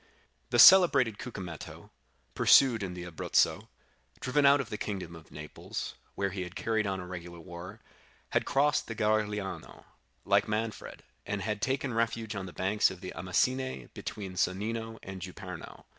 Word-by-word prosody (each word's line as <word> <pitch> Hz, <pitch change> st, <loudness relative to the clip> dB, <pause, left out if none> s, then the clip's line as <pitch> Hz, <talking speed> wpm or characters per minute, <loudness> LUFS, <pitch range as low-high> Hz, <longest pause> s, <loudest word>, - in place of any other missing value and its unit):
"The -, -, +1 dB
celebrated 140 Hz, -, +8 dB
Cucumetto, 90 Hz, -9 st, -8 dB, 0.4 s
pursued 125 Hz, -5 st, +5 dB
in 90 Hz, -2 st, -4 dB
the 90 Hz, -, -6 dB
Abruzzo, 85 Hz, -3 st, +1 dB, 0.5 s
driven 140 Hz, +2 st, +3 dB
out 140 Hz, +1 st, +6 dB
of 130 Hz, -5 st, -4 dB
the 105 Hz, -, -3 dB
kingdom 95 Hz, -5 st, -4 dB
of 80 Hz, -1 st, -14 dB
Naples, 75 Hz, 0 st, -6 dB, 0.2 s
where 100 Hz, -1 st, -1 dB
he 95 Hz, 0 st, -4 dB
had 90 Hz, 0 st, -7 dB
carried 110 Hz, -2 st, 0 dB
on 95 Hz, -1 st, -2 dB
a 90 Hz, -, -6 dB
regular 85 Hz, -1 st, -8 dB
war, 85 Hz, +6 st, -10 dB, 0.5 s
had -, -, +1 dB
crossed 145 Hz, +1 st, +2 dB
the 115 Hz, -, -5 dB
Garigliano, 105 Hz, -2 st, -2 dB, 0.4 s
like 100 Hz, 0 st, +3 dB
Manfred, 110 Hz, 0 st, -4 dB, 0.2 s
and 100 Hz, -1 st, -3 dB
had 105 Hz, -1 st, -2 dB
taken 135 Hz, -1 st, -1 dB
refuge 115 Hz, -1 st, -1 dB
on 95 Hz, -1 st, -4 dB
the -, -, -8 dB
banks 100 Hz, +4 st, +2 dB
of 95 Hz, -1 st, -9 dB
the 90 Hz, -, -6 dB
Amasine 125 Hz, -, -1 dB
between 100 Hz, -3 st, -6 dB
Sonnino 110 Hz, +5 st, -1 dB
and 95 Hz, -1 st, -8 dB
Juperno. 90 Hz, -1 st, -9 dB
105 Hz, 160 wpm, -30 LUFS, 90-115 Hz, 0.5 s, celebrated